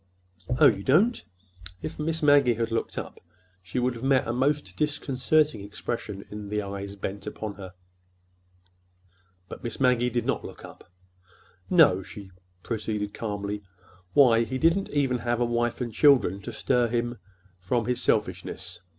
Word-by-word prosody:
"Oh, -, -, +7 dB
you 100 Hz, -, +5 dB
don't!" 190 Hz, -, +3 dB, 0.6 s
If 155 Hz, 0 st, -6 dB
Miss 160 Hz, +1 st, -2 dB
Maggie 140 Hz, -5 st, +5 dB
had 115 Hz, 0 st, -2 dB
looked 115 Hz, -, -2 dB
up, -, -, -6 dB, 0.4 s
she 90 Hz, +7 st, -7 dB
would 125 Hz, 0 st, +1 dB
have 115 Hz, -, -9 dB
met 135 Hz, -1 st, +3 dB
a 120 Hz, -, -1 dB
most 145 Hz, +4 st, 0 dB
disconcerting 150 Hz, -2 st, +1 dB
expression 105 Hz, -1 st, -5 dB
in 105 Hz, -1 st, -7 dB
the 105 Hz, 0 st, -1 dB
eyes 100 Hz, 0 st, -6 dB
bent 100 Hz, 0 st, -6 dB
upon 110 Hz, -2 st, -5 dB
her. 95 Hz, -3 st, -10 dB, 1.7 s
But -, -, -10 dB
Miss 120 Hz, -2 st, -4 dB
Maggie 125 Hz, -2 st, +3 dB
did 120 Hz, -1 st, -2 dB
not -, -, -1 dB
look -, -, -9 dB
up. -, -, -15 dB, 0.8 s
"No," 155 Hz, -, +5 dB
she 95 Hz, 0 st, -11 dB, 0.3 s
proceeded 105 Hz, -2 st, -3 dB
calmly. 105 Hz, -1 st, -4 dB, 0.5 s
"Why, 120 Hz, -5 st, +6 dB
he 115 Hz, +3 st, -3 dB
didn't 165 Hz, +7 st, +2 dB
even 135 Hz, -4 st, +1 dB
have 120 Hz, 0 st, -1 dB
a 120 Hz, -, +2 dB
wife 120 Hz, +1 st, -1 dB
and 120 Hz, -2 st, -3 dB
children 125 Hz, -10 st, +4 dB
to 120 Hz, -, -6 dB
stir 120 Hz, +2 st, +1 dB
him 120 Hz, 0 st, -2 dB, 0.4 s
from 115 Hz, +6 st, -1 dB
his 125 Hz, +1 st, -1 dB
selfishness. 95 Hz, -3 st, -1 dB
120 Hz, 155 wpm, -26 LUFS, 105-135 Hz, 1.7 s, Oh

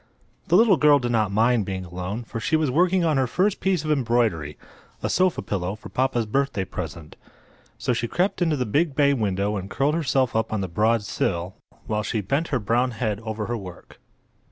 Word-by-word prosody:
The 175 Hz, -, +3 dB
little 215 Hz, -4 st, +5 dB
girl 145 Hz, +1 st, +6 dB
did 120 Hz, -3 st, -2 dB
not 110 Hz, -4 st, +1 dB
mind 115 Hz, +2 st, +3 dB
being 95 Hz, -1 st, -4 dB
alone, 90 Hz, +6 st, -5 dB
for 115 Hz, 0 st, -6 dB
she 160 Hz, -, 0 dB
was 155 Hz, -4 st, +1 dB
working 180 Hz, +4 st, +3 dB
on 155 Hz, -3 st, +2 dB
her 130 Hz, -1 st, +2 dB
first 190 Hz, -, +1 dB
piece 185 Hz, -5 st, 0 dB
of 155 Hz, -, 0 dB
embroidery—a 115 Hz, -, -2 dB
sofa 185 Hz, -1 st, +1 dB
pillow 95 Hz, -1 st, -3 dB
for 110 Hz, -, -12 dB
papa's 130 Hz, -3 st, 0 dB
birthday 110 Hz, -4 st, -1 dB
present. 85 Hz, -3 st, -7 dB, 0.6 s
So 125 Hz, -, 0 dB
she 120 Hz, 0 st, -2 dB
crept 180 Hz, -, -1 dB
into 160 Hz, -4 st, +2 dB
the 125 Hz, -, -1 dB
big 145 Hz, +6 st, 0 dB
bay 140 Hz, -1 st, +4 dB
window 100 Hz, -3 st, -1 dB
and 95 Hz, 0 st, -6 dB
curled 140 Hz, +6 st, +1 dB
herself 135 Hz, -6 st, +1 dB
up 110 Hz, 0 st, 0 dB
on 110 Hz, -2 st, -1 dB
the 95 Hz, -, -2 dB
broad 110 Hz, +5 st, +1 dB
sill 90 Hz, -2 st, -2 dB, 0.3 s
while 105 Hz, -1 st, -1 dB
she 105 Hz, +1 st, -2 dB
bent 140 Hz, -, -1 dB
her 140 Hz, -, 0 dB
brown 120 Hz, +4 st, +1 dB
head 110 Hz, -4 st, -1 dB
over 110 Hz, -1 st, -4 dB
her 120 Hz, -, -2 dB
work. 95 Hz, -4 st, -11 dB
115 Hz, 205 wpm, -24 LUFS, 100-145 Hz, 0.6 s, girl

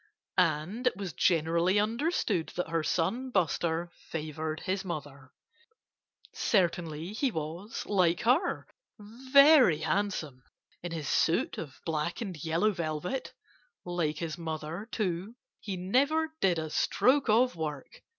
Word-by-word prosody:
And 195 Hz, -, +1 dB
it 250 Hz, -, +1 dB
was 195 Hz, -5 st, -5 dB
generally 170 Hz, +4 st, +2 dB
understood 220 Hz, -, 0 dB
that 180 Hz, -2 st, -2 dB
her 165 Hz, 0 st, 0 dB
son 225 Hz, +12 st, -1 dB
Buster 170 Hz, -, 0 dB
favored 155 Hz, 0 st, -5 dB
his 190 Hz, 0 st, -2 dB
mother. 145 Hz, -7 st, -7 dB, 1.0 s
Certainly 170 Hz, -3 st, 0 dB
he 265 Hz, +5 st, +1 dB
was 170 Hz, +3 st, -5 dB
like 180 Hz, -4 st, +2 dB
her 255 Hz, +10 st, +2 dB, 0.3 s
very 260 Hz, -, +5 dB
handsome, 165 Hz, -10 st, -1 dB, 0.4 s
in 175 Hz, -, -5 dB
his 160 Hz, -4 st, -4 dB
suit 165 Hz, +4 st, +1 dB
of 140 Hz, -5 st, -8 dB
black 160 Hz, +1 st, -2 dB
and 195 Hz, -6 st, -4 dB
yellow 165 Hz, +7 st, +2 dB
velvet. 170 Hz, -, -4 dB, 0.5 s
Like 170 Hz, -4 st, -1 dB
his 165 Hz, 0 st, -4 dB
mother, 160 Hz, +5 st, -5 dB
too, 195 Hz, +1 st, -2 dB, 0.2 s
he 195 Hz, -3 st, -5 dB
never 285 Hz, -, +1 dB
did 180 Hz, -3 st, +3 dB
a 155 Hz, -1 st, -3 dB
stroke 265 Hz, -, +2 dB
of 240 Hz, +2 st, +4 dB
work. 150 Hz, -4 st, -6 dB
175 Hz, 125 wpm, -30 LUFS, 160-215 Hz, 1.0 s, very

